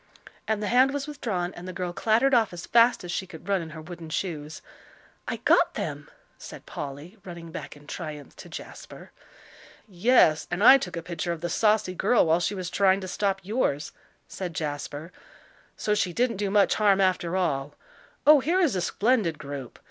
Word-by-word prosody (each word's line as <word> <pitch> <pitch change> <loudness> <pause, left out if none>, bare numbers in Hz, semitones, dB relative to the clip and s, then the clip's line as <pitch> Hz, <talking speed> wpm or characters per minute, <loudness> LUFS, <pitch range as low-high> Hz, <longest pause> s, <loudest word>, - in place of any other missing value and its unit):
And 215 -1 -1
the - - -1
hand 255 +4 +5
was 285 -1 -2
withdrawn, 210 -12 -3
and 175 +1 -9
the 185 - -6
girl 180 -1 -4
clattered 230 +8 +2
off 225 -6 +3
as 175 - -7
fast 235 -1 +4
as 175 - -5
she 190 - -3
could 160 +1 -12
run 195 -2 +1
in 165 - -7
her 160 0 -9
wooden 170 -1 -9
shoes. 155 -3 -4 0.6
"I - - -2
got - - +4
them," - - -5 0.3
said - - -10
Polly, 145 +9 -8
running 170 -2 -9
back 150 - -8
in 145 - -18
triumph 150 -3 -7
to - - -11
Jasper. - - -10 0.8
"Yes, 185 -4 +3
and 180 +3 -2
I 270 +4 +9
took 180 -7 -5
a 165 - -5
picture 170 0 -3
of 165 - -8
the 175 - -2
saucy 215 -3 +2
girl 210 +5 +3
while 165 +1 +3
she 175 +4 -1
was 185 -2 -5
trying 195 -1 +3
to 185 - -6
stop 195 +1 -1
yours," 185 - -1 0.4
said 180 -3 -6
Jasper. 150 +1 -5 0.7
"So 210 - 0
she 185 -4 0
didn't 240 -1 0
do 200 0 -1
much 200 -1 +4
harm, 205 -2 +3
after 185 -2 +1
all. 145 -6 -1 0.5
Oh, 300 0 +8
here 335 +8 +1
is 325 - +2
a 180 - 0
splendid 205 -4 +1
group! 140 -3 -8
185 Hz, 195 wpm, -26 LUFS, 165-215 Hz, 0.8 s, I